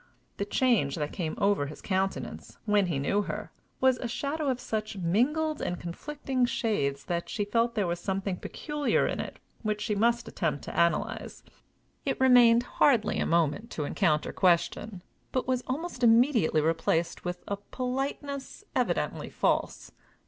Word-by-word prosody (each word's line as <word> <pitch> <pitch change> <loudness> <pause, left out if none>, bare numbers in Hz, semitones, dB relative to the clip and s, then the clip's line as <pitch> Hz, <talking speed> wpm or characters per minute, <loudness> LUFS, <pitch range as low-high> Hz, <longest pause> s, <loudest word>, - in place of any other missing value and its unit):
The 200 - -1
change 205 - +2
that 150 -2 -3
came 160 -4 -3
over 200 -8 +2
his 150 - -9
countenance, 190 0 -3
when 205 -3 +3
he 165 -5 -1
knew 200 +9 +1
her, - - -5 0.3
was 260 -1 +3
a 245 - -3
shadow 285 +5 -2
of 255 -1 0
such 215 -3 -3
mingled 285 - +1
and 175 - -2
conflicting 260 - -2
shades 145 - -1
that 170 -1 -2
she 205 - -1
felt 230 +3 +1
there 205 -4 +1
was 170 0 -2
something 190 0 -2
peculiar 295 - -1
in - - -2
it - - -5 0.2
which 215 -2 -1
she 210 +1 -1
must 235 +3 +2
attempt 145 - -2
to - - -7
analyze. 170 0 0 0.6
It - - -1
remained 245 -2 +6
hardly 240 -4 +2
a - - 0
moment 170 +7 +1
to 150 - -2
encounter 155 -3 +1
question, 180 +2 +1 0.3
but 255 - -1
was 255 -1 +1
almost 280 -1 -4
immediately 230 - +4
replaced 165 +1 0
with 180 0 -4
a 200 - -2
politeness 270 +2 -4
evidently - - 0
false. - - -1
210 Hz, 155 wpm, -29 LUFS, 175-255 Hz, 0.6 s, remained